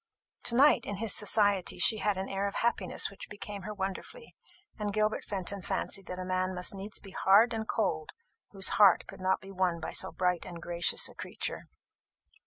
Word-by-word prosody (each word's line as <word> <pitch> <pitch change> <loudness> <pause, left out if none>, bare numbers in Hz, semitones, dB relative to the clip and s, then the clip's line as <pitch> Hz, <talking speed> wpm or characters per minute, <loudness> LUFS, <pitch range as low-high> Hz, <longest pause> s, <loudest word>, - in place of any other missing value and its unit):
To 235 - +1
night, 270 -2 +5
in 205 - -3
his 210 0 -1
society, 205 -3 +3
she 220 - +3
had 205 -2 0
an 190 +1 -3
air 195 +1 -1
of 200 - -5
happiness 205 -7 0
which 200 - -10
became 205 0 -7
her 210 +3 -6
wonderfully; 440 - -6 0.4
and 210 -1 -2
Gilbert 215 +1 0
Fenton 195 0 -2
fancied 195 +1 -3
that 180 - -5
a 185 - -5
man 185 0 -1
must 180 +2 0
needs 200 +2 -5
be 195 - -13
hard 205 +6 +4
and 220 -1 -3
cold 155 -8 -1 0.4
whose 195 -2 0
heart 195 -4 +6
could - - -11
not 185 0 +1
be 195 - -11
won 180 -3 0
by 160 - -5
so 190 - 0
bright 180 -2 0
and 170 -1 -8
gracious 175 0 +1
a - - -14
creature. - - -5
195 Hz, 195 wpm, -30 LUFS, 185-210 Hz, 0.4 s, heart